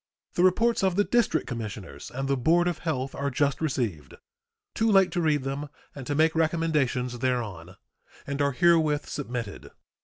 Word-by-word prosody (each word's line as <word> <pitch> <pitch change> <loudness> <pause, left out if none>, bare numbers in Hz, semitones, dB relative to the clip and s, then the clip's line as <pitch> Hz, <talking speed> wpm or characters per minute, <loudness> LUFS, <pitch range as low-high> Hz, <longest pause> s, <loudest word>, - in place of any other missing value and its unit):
The 175 - +1
reports 225 +6 +3
of 190 -2 +2
the 205 - +3
District 240 +1 +1
Commissioners 105 - -6
and 135 +2 -4
the 140 - +2
board 165 +7 +3
of 175 -3 -2
health 135 -5 -2
are 140 0 -2
just 140 +3 0
received 110 - -2 0.6
too 225 0 +1
late 195 -2 +5
to 175 - -1
read 150 -4 +1
them 140 +2 -4 0.2
and 135 -3 -8
to 145 - -1
make 160 +2 +3
recommendations 155 -7 0
thereon 105 -9 -2 0.5
and 140 +1 -3
are 140 -1 +1
herewith 160 -2 +3
submitted. 120 -7 -5
145 Hz, 165 wpm, -27 LUFS, 125-165 Hz, 0.6 s, late